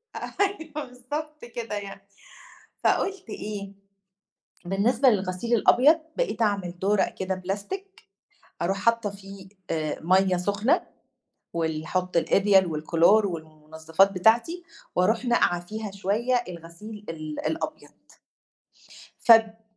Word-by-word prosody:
أيوه 320 -7 -3
بالضبط 295 +4 -7
كده 235 -2 -5
يعني، 200 -1 -7 0.8
فقُلت 380 - 0
إيه، 205 -2 -6 0.9
بالنسبة 225 +8 +2
للغسيل 200 +2 0
الأبيض، 280 +8 +5 0.2
بقيت - - -1
أعمل 190 -4 -1
دُورق 200 +1 +1
كده 190 0 -2
بلاستيك، 290 - -6 0.6
أرُوح 195 +3 0
حاطّة 230 0 +1
فيه، 195 -1 -12 0.2
آآ، 155 -2 -2
مَيَّه 185 +2 +3
سُخنة، 205 +7 +1 0.7
وال 160 -2 -2
أحُطّ 180 0 -2
الإريال 195 +2 +4
والكلور 170 +6 +3
والمنظّفات 160 +2 0
بتاعتي، 230 - +2 0.3
وأرُوح 220 +7 +2
ناقعة 175 -7 +1
فيها 215 0 -5
شوية 225 +6 0
الغسيل 180 +5 -10
ال 155 -2 -5
الأبيض. 320 - -4 1.3
فب 225 -1 +5
200 Hz, 105 wpm, -26 LUFS, 180-235 Hz, 1.3 s, الأبيض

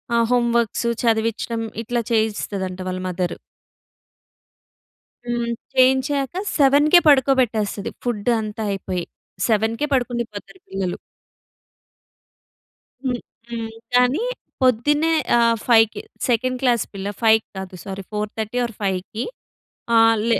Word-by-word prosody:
ఆహ్, 230 0 +4
home 240 -1 +3
works, 235 0 0 0.2
చదివించడం 230 0 0 0.2
ఇట్లా 240 +1 -1
చేయిస్తదంట 205 -4 -1
వాళ్ళ 185 0 -3
మదర్. 180 -1 -2 1.9
హ్మ్. 240 -1 -1 0.2
చేయించాక 265 +2 +3 0.2
7కే 290 +4 +6
పడుకోబెట్టేస్తది. 250 -8 +3
ఫుడ్ 240 -2 -1
అంతా 215 +1 -4
అయిపోయి. 185 -2 -3 0.4
7కే 225 +5 +1
పడుకుండి 245 -2 0
పోతారు 205 - -10
పిల్లలు. 190 -2 -3 2.1
హ్మ్. 250 -2 -1 0.3
హ్మ్. 230 -1 -4 0.2
కానీ 250 - +3 0.4
పొద్దున్నే 295 +6 +3 0.2
ఆహ్, 230 -1 +4
5కి 225 -2 +4 0.3
సెకండ్ 255 +2 +1
క్లాస్ 240 -4 +3
పిల్ల 195 0 -4
5కి 220 -1 +4
కాదు 190 -1 -6
సారీ, 195 0 -6
4:30 215 +2 -3
ఆర్ 235 - -6
5కి 195 +4 -2 0.7
ఆహ్, 225 0 +6
లే - - +3
230 Hz, 105 wpm, -22 LUFS, 210-250 Hz, 2.1 s, 7కే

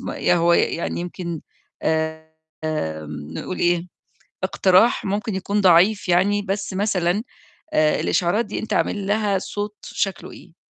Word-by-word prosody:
ما - - -5
يا - - +3
هو 170 0 +3
يعني 170 0 +1
يمكن 175 -2 -5 1.2
آمم، 80 - -4
نقول 180 - -5
إيه، 175 0 +1 0.6
اقتراح 190 +4 +3
ممكن 210 +2 -2
يكون 200 +2 -1
ضعيف 190 +3 +4
يعني، 195 +4 +3
بس 200 0 -3
مثلًا 190 0 0 0.5
آآ 155 0 +3
الإشعارات 195 +7 +1
دي 210 - -4
أنت 220 - -4
عامل 200 -2 0
لها 205 -2 +1
صوت 205 +2 -5
شكله 195 -3 -3
إيه؟ 170 -2 -15
185 Hz, 135 wpm, -22 LUFS, 170-205 Hz, 1.2 s, ضعيف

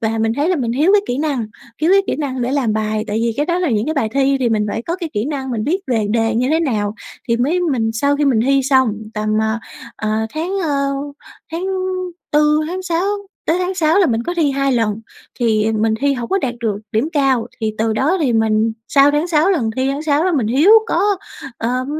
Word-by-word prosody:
và 225 -1 -1
mình 225 0 +1
thấy 290 +3 +1
là 365 - +2
mình 235 -4 -1
thiếu 305 +10 +3
cái 410 -1 +5
kỹ 245 - -2
năng, 280 -7 -1 0.3
thiếu 320 +4 +2
cái 395 0 +5
kỹ - - -1
năng 265 -4 -3
để 250 +3 -1
làm 260 -6 +1
bài, 215 0 -1
tại 210 +2 -2
vì 230 0 +1
cái 295 +2 0
đó 345 0 0
là 355 -5 0
những 220 -1 0
cái 315 - -1
bài 275 -7 0
thi 275 0 +2
thì 245 - +2
mình 215 -2 +1
phải 220 +3 -3
có 335 +7 -3
cái 345 -3 -5
kỹ 210 +1 -1
năng, 270 -3 -4
mình 220 -3 -2
biết 355 - 0
về 225 -4 0
đề 225 0 +1
như 250 +3 +1
thế 320 +1 +2
nào 215 -9 -1 0.3
thì 230 - +2
mới 290 +10 +1
mình 255 -10 0
sau 280 +6 +1
khi 295 - +1
mình 250 -6 +3
thi 275 +3 +3
xong 260 -4 +3 0.2
tầm, 215 0 -2
ờ, 220 +1 0 0.4
ờ, 215 - -3 0.3
tháng, 355 +5 -2
ơ, 280 -3 0 0.7
tháng 340 +3 -3 0.7
4, 300 0 +3
tháng 365 +3 -4
6 345 -1 -1 0.4
tới 330 +3 +2
tháng 365 +1 -1
6 325 0 +2
là 380 - +4
mình 230 -1 0
có 350 +8 -3
thi 310 -4 +2
2 275 0 0
lần 225 -3 0 0.4
thì 220 -2 +2
mình 220 0 +1
thi 280 0 +2
hổng 240 -3 -5
có 390 - +1
đạt 255 -9 -2
được 220 -4 -1 0.2
điểm 225 +8 +1
cao. 265 -5 +2
Thì 215 -1 -1
từ 220 0 +1
đó 275 +11 +1
thì 270 -6 +1
mình 220 0 +2 0.2
sau 280 0 +5
tháng 295 +4 0
6 325 +2 +3
lần 250 - +1
thi 260 +1 +1
tháng 280 +2 -2
6 305 +1 +1
đó 370 - +1
mình 260 -9 +1
thiếu 280 - +4 0.2
có, - - +1 0.6
ờm, 250 +3 -1
265 Hz, 250 wpm, -18 LUFS, 225-310 Hz, 0.7 s, cái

